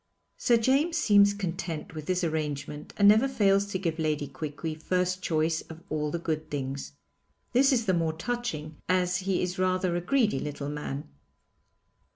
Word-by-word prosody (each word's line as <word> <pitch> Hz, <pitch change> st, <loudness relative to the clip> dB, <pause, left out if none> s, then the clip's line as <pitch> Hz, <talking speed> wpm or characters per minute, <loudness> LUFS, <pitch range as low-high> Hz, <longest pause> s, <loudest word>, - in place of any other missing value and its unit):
Sir 240 Hz, -, +3 dB
James 275 Hz, +8 st, +2 dB
seems 205 Hz, -7 st, +5 dB
content 175 Hz, -5 st, -4 dB
with 155 Hz, -1 st, -7 dB
this 185 Hz, 0 st, 0 dB
arrangement 150 Hz, -2 st, -3 dB
and 205 Hz, -, +6 dB
never 220 Hz, +6 st, +6 dB
fails 200 Hz, -6 st, +3 dB
to 200 Hz, -, -2 dB
give 165 Hz, -3 st, -2 dB
Lady 150 Hz, -2 st, 0 dB
Quiqui 155 Hz, +3 st, -5 dB
first 180 Hz, +3 st, -1 dB
choice 160 Hz, -1 st, +1 dB
of 165 Hz, +1 st, -10 dB
all 150 Hz, -1 st, 0 dB
the 170 Hz, -, -2 dB
good 155 Hz, -2 st, -3 dB
things. 135 Hz, -1 st, -4 dB, 0.6 s
This 270 Hz, +3 st, +5 dB
is 235 Hz, -4 st, +2 dB
the 185 Hz, -, +2 dB
more 165 Hz, -2 st, +1 dB
touching 160 Hz, -6 st, -4 dB
as 180 Hz, 0 st, +2 dB
he 185 Hz, -1 st, 0 dB
is 180 Hz, +1 st, -3 dB
rather 185 Hz, -1 st, +1 dB
a 175 Hz, -, 0 dB
greedy 210 Hz, -, +2 dB
little 145 Hz, 0 st, -4 dB
man. 150 Hz, -1 st, -5 dB
175 Hz, 170 wpm, -28 LUFS, 155-200 Hz, 0.6 s, and